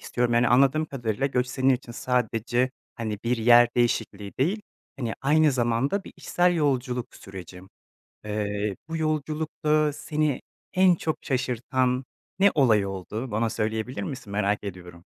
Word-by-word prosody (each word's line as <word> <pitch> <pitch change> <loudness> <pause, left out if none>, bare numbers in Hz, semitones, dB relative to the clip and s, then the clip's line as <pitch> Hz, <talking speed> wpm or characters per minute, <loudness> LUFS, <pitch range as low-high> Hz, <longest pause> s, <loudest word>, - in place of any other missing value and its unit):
istiyorum, 120 -1 0
yani, 120 0 +4
anladığım 135 +5 +4
kadarıyla, 120 -2 -2
göç 125 -2 0
senin 130 +1 +1
için 125 -1 -7
sadece, 125 0 0 0.2
hani, 110 -4 -4
bir 120 +1 +1
yer 120 +1 +6
değişikliği 105 -4 0
değil, 190 +11 +1 0.3
hani, 120 -4 -3
aynı 150 +1 +4
zamanda 130 - 0
bir - - -11
içsel 175 0 +1
yolculuk 130 -6 -1
süreci. 95 -1 -10 0.6
Eee, 105 -1 -2
bu 165 - -3
yolculukta 155 0 0
seni 150 -2 -1 0.3
en 185 -1 +5
çok 160 -1 -2
şaşırtan 125 0 0 0.3
ne 200 +1 +6
olay 110 -9 +4
oldu? 100 +6 -5
Bana 110 +2 0
söyleyebilir 110 +1 -2
misin, 125 -1 -6
merak 105 0 0
ediyorum. 90 -3 -9
125 Hz, 140 wpm, -26 LUFS, 110-145 Hz, 0.6 s, yer